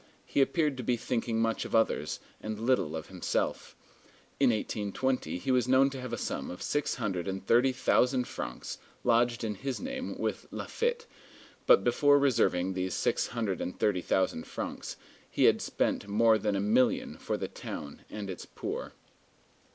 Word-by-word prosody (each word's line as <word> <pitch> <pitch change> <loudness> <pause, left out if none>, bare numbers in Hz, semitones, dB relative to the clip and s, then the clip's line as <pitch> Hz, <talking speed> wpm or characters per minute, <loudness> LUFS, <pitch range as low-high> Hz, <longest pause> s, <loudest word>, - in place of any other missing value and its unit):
He - - +1
appeared 150 0 +2
to 125 - -4
be 120 +1 +1
thinking 115 -1 -1
much 115 0 +1
of - - -3
others, 110 -9 +1 0.2
and 110 0 -4
little 115 -10 +1
of 80 0 -5
himself. 90 -2 -2 0.6
In 135 -2 +5
1820 105 -2 -1
he 130 +9 -2
was 125 -1 +3
known 135 +1 +5
to 135 -1 -6
have 125 -2 -6
a 120 - -2
sum - - -3
of 90 - -7
six 145 -1 0
hundred 95 -3 -2
and 95 0 -4
thirty 120 +5 +4
thousand 125 0 +2
francs - - -6 0.2
lodged 120 0 +3
in 110 -2 -1
his 130 +5 -4
name 265 0 -4
with - - -3
Laffitte; 475 0 -2 0.6
but - - +7
before 145 -1 +5
reserving 95 -9 +2
these 95 0 -2
six - - +1
hundred 110 -6 -2
and 90 - -4
thirty 100 -4 +1
thousand 95 -3 0
francs, - - -5 0.3
he - - 0
had - - +5
spent 105 - -1
more 110 +2 +4
than 105 0 0
a - - +1
million 110 +6 +2
for - - -2
the - - -3
town 70 -1 -7
and 105 -2 -5
its 95 -2 -7
poor. - - -5
115 Hz, 175 wpm, -30 LUFS, 95-130 Hz, 0.6 s, but